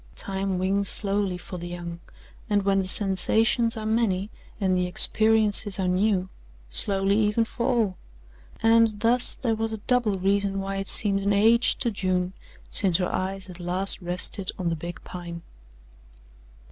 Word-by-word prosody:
Time 195 -1 -3
wings 195 +2 0
slowly 200 -3 +1
for 180 0 -9
the 175 - -7
young, 175 -1 -7 0.5
and 205 -1 +1
when 195 0 +2
the 190 - -2
sensations 220 +4 +1
are 215 - -5
many 215 -3 0 0.3
and 190 -3 +1
the 180 0 0
experiences 215 +1 +3
are 185 - 0
new, 185 0 +1 0.4
slowly 195 - +2
even 215 +2 +1
for 235 +2 -4
all 225 -8 0 0.7
and 225 -2 +3
thus 245 +2 +1
there 235 -3 -1
was 225 0 -2
a 220 - -4
double 240 -6 +1
reason 195 +1 0
why 195 0 -4
it 195 0 -4
seemed 200 -2 0
an 200 +1 0
age 225 +4 +4
to 235 - -1
June 185 -2 -1 0.4
since 185 -4 +3
her 180 -1 -2
eyes 190 +1 -3
had 185 -2 -10
last 180 +3 +4
rested 180 +2 -2
on 180 -2 -2
the 165 - -1
big 175 +3 -7
Pine. 170 -1 -8
195 Hz, 160 wpm, -25 LUFS, 185-220 Hz, 0.7 s, age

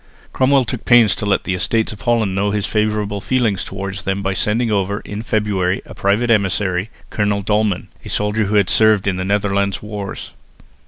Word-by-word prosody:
Cromwell 135 0 +3
took 115 +1 -5
pains 120 -4 +5
to 105 - -4
let 100 - +1
the 95 - -2
Estates 110 +6 0
of 110 - -10
Holland 115 -5 +1
know 100 +2 0
his 105 -1 -1
favourable 105 -1 -1
feelings 115 -6 0
towards 95 0 -6
them 95 +2 -2
by 95 0 0
sending 110 +4 0
over, 100 0 -1
in 105 +1 -6
February, 100 -4 -1
a - - -11
private 105 +5 +1
emissary, 95 -2 +1 0.2
Colonel 105 -1 0
Dolman, 105 -2 0 0.2
a - - -9
soldier 105 +1 0
who 105 +2 -1
had 100 -2 +4
served 110 -3 +4
in 95 -2 0
the 95 - -2
Netherland 100 -1 0
wars. 105 -2 -7
105 Hz, 190 wpm, -18 LUFS, 100-110 Hz, 0.2 s, pains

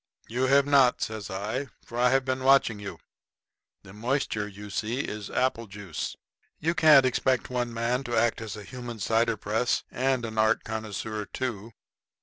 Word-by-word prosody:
"You 125 +3 0
have 140 +1 +5
not," 140 -3 +4
says 110 -2 -5
I, 105 +8 -3 0.2
"for 120 - -6
I've 130 +2 +3
been 130 -1 -1
watching 135 -5 +4
you. 100 -1 -7 0.9
The 95 - -13
moisture 110 -2 -1
you 105 0 -10
see 115 +6 -1
is 105 -6 -5
apple 120 -3 0
juice. 100 -5 -5 0.4
You 165 +2 0
can't 150 -5 +7
expect 130 0 +1
one 120 -1 -1
man 120 +3 -1
to 120 -1 -1
act 115 0 +2
as 110 -2 -6
a 105 - -8
human 120 0 -7
cider 115 +1 +1
press 110 +4 0
and 130 -1 0
an 110 -1 -4
art 110 +1 +3
connoisseur 110 -1 -4
too." 115 -3 -5
115 Hz, 165 wpm, -27 LUFS, 110-130 Hz, 0.9 s, can't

